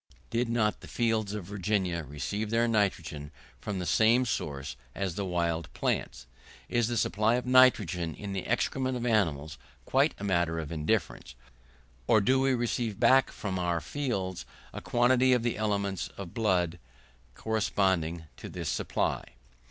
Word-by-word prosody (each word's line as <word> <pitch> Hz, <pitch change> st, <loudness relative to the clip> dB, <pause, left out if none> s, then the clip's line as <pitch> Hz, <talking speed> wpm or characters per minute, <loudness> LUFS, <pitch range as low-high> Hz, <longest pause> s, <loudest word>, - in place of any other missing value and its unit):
Did 115 Hz, +1 st, 0 dB
not 110 Hz, -3 st, +1 dB
the -, -, -11 dB
fields 110 Hz, -3 st, 0 dB
of 105 Hz, -, -4 dB
Virginia 95 Hz, -3 st, -1 dB
receive 75 Hz, +10 st, -4 dB
their 115 Hz, +1 st, +2 dB
nitrogen 85 Hz, -9 st, -1 dB, 0.3 s
from 105 Hz, -2 st, -4 dB
the 90 Hz, -, -3 dB
same 115 Hz, +7 st, +4 dB
source 70 Hz, -, -3 dB, 0.2 s
as 95 Hz, -4 st, -2 dB
wild 85 Hz, -3 st, -1 dB
plants? -, -, -2 dB, 0.4 s
Is 120 Hz, -2 st, +1 dB
the 120 Hz, 0 st, -1 dB
supply 110 Hz, +2 st, +2 dB
of 125 Hz, -, -2 dB
nitrogen 105 Hz, -, +4 dB
in 100 Hz, -2 st, -6 dB
the 95 Hz, -, -4 dB
excrements 130 Hz, +2 st, 0 dB
of 120 Hz, -, -4 dB
animals 80 Hz, -, 0 dB, 0.3 s
quite -, -, +2 dB
a -, -, -8 dB
matter 85 Hz, -4 st, +1 dB
of 80 Hz, -2 st, -4 dB
indifference, 75 Hz, -5 st, -2 dB, 0.7 s
or 110 Hz, -, +5 dB
do 130 Hz, +6 st, +3 dB
we 135 Hz, -1 st, +3 dB
receive 120 Hz, -3 st, -2 dB
back 130 Hz, +2 st, +5 dB
from 95 Hz, -3 st, -4 dB
our 85 Hz, -1 st, 0 dB
fields 95 Hz, -, -3 dB, 0.3 s
a -, -, -6 dB
quantity 125 Hz, +1 st, +3 dB
of 125 Hz, -2 st, +2 dB
the 120 Hz, -, 0 dB
elements 100 Hz, -3 st, -1 dB
of 95 Hz, -4 st, -7 dB
blood 90 Hz, -6 st, +1 dB, 0.6 s
corresponding 95 Hz, -6 st, 0 dB
to -, -, -8 dB
this -, -, -4 dB
supply? -, -, -1 dB
100 Hz, 150 wpm, -29 LUFS, 85-115 Hz, 0.7 s, or